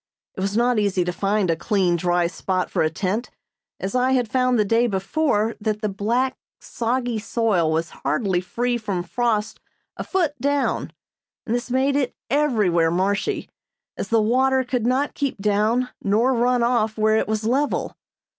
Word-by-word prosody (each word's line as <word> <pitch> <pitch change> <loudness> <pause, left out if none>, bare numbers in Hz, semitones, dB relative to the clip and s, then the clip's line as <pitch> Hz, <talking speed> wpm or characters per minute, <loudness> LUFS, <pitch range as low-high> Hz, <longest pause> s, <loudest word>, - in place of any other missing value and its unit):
It - - -7
was 200 +2 -1
not 240 -1 +3
easy 195 -3 +1
to 180 - -2
find 195 0 +1
a - - +1
clean, 185 0 +1
dry 175 0 +1
spot 185 +2 -2
for - - 0
a 155 - +2
tent, 195 +8 -2 0.5
as 190 - -4
I 255 +1 +2
had 250 -3 +1
found 255 +2 +2
the 210 - +2
day 230 +4 +2
before 220 +2 0
that 210 0 -1
the 210 - +1
black, 235 +7 0 0.2
soggy 240 -1 -2
soil 210 -7 +1
was 160 0 -1
hardly 190 -5 0
free 240 +6 -1
from 200 -5 -3
frost 220 +2 -1 0.4
a - - -3
foot 345 -6 0
down, 285 0 0 0.5
and 225 - -2
this 245 +1 -2
made 265 +2 +1
it 270 -3 0 0.2
everywhere 210 - +2
marshy, 195 - -1 0.5
as - - -4
the 230 - +3
water 260 +3 +2
could 245 -2 -1
not 265 +3 +1
keep 280 -2 -2
down 215 +5 +1
nor 225 +6 +2
run 245 0 +2
off 230 -2 +1
where 215 0 +3
it - - 0
was 215 0 -1
level. 270 +6 0
220 Hz, 175 wpm, -22 LUFS, 195-250 Hz, 0.5 s, not